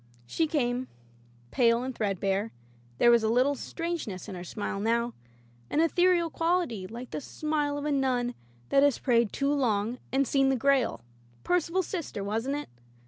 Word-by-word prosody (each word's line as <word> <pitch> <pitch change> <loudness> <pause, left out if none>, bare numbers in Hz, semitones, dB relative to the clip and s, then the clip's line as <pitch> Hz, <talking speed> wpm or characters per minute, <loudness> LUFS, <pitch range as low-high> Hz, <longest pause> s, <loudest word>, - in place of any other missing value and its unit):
She 320 - 0
came, 255 -4 0 0.6
pale 235 -1 +3
and 260 0 -3
threadbare; 200 0 -1 0.5
there 240 - +6
was 235 -1 +5
a 220 - +1
little 255 +5 +3
strangeness 325 - -4
in - - -6
her 175 -1 -6
smile 195 +2 -4
now, 235 +2 0 0.6
an - - 0
ethereal 340 0 +3
quality, 330 - 0
like 240 +4 -8
the - - -4
smile 295 0 -2
of 290 - -4
a 300 - 0
nun 255 -3 +1 0.4
that 275 - +4
has 285 -3 +4
prayed 235 -4 +2
too 280 +1 0
long 235 -3 0
and 270 0 +2
seen 270 -1 +3
the 270 - +2
Grail 265 - +2 0.2
— 120 0 -30
Percival's 360 +1 +1
sister, 320 - -4
wasn't 225 +7 -1
it 295 - -5
255 Hz, 170 wpm, -28 LUFS, 225-295 Hz, 0.6 s, there